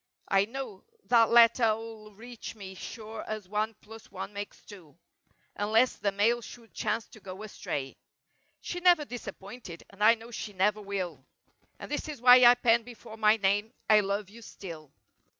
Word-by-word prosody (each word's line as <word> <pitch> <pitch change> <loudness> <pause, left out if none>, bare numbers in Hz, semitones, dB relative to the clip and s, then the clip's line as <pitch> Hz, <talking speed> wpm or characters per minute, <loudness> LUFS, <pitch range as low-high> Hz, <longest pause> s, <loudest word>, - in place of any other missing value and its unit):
I 195 0 +4
know 235 -4 -7 0.3
that 230 -2 +5
letter 230 -1 +6
'll 220 -1 -10
reach 235 +1 -9
me 195 -3 -9
sure 220 +3 -8
as 215 -3 -5
one 215 +2 -2
plus 225 +1 -13
one 210 - -7
makes 205 0 -8
two. 175 -8 -14 0.6
Unless 220 +5 +2
the 200 - 0
mail 225 +5 +2
should 230 0 -13
chance 215 +1 -2
to - - -15
go 190 +1 -9
astray. 140 -10 -5 0.6
She 355 - -5
never 350 -4 +4
disappointed 200 -5 -9
and 200 +1 -5
I 225 +2 +7
know 230 +1 -13
she 215 -2 -6
never 205 +3 +1
will 185 -8 -5 0.5
And - - -10
this 295 - -3
is 295 -4 -7
why 250 +1 +8
I 240 +1 +9
pen 235 -1 +3
before 230 -1 -12
my 215 0 +4
name— 205 +3 0
"I 215 -1 +6
love 200 0 -2
you 230 +2 -13
still!" 165 -9 -10
215 Hz, 170 wpm, -29 LUFS, 200-235 Hz, 0.6 s, I